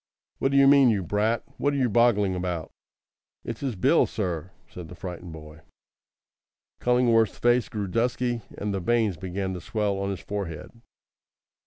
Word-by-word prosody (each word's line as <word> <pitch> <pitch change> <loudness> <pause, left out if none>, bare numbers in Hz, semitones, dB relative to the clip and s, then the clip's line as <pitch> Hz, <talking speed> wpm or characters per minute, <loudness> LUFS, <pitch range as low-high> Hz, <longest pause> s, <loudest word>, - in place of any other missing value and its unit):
"What 135 - +1
d'you 140 0 +5
mean, 140 -2 +7
you 100 -4 +1
brat? 105 +6 0 0.2
What 145 0 +1
are - - 0
you 130 -2 +2
boggling 105 -4 +3
about?" 90 -3 -3 0.7
"It's 115 -1 -6
his 135 -5 -3
bill, 90 - +3
sir," 85 -1 -3 0.2
said 90 -2 -9
the 90 - -11
frightened 90 -1 -7
boy. 75 -1 -11 1.2
Cullingworth's 120 -3 +3
face 120 0 +2
grew 105 -2 -3
dusky, 120 +3 -1 0.2
and 105 0 -3
the 95 - -1
veins 110 0 +1
began 95 +2 -4
to 90 - -6
swell 105 0 -1
on 100 0 -2
his 95 -2 -4
forehead. 95 -6 -5
105 Hz, 160 wpm, -26 LUFS, 90-120 Hz, 1.2 s, mean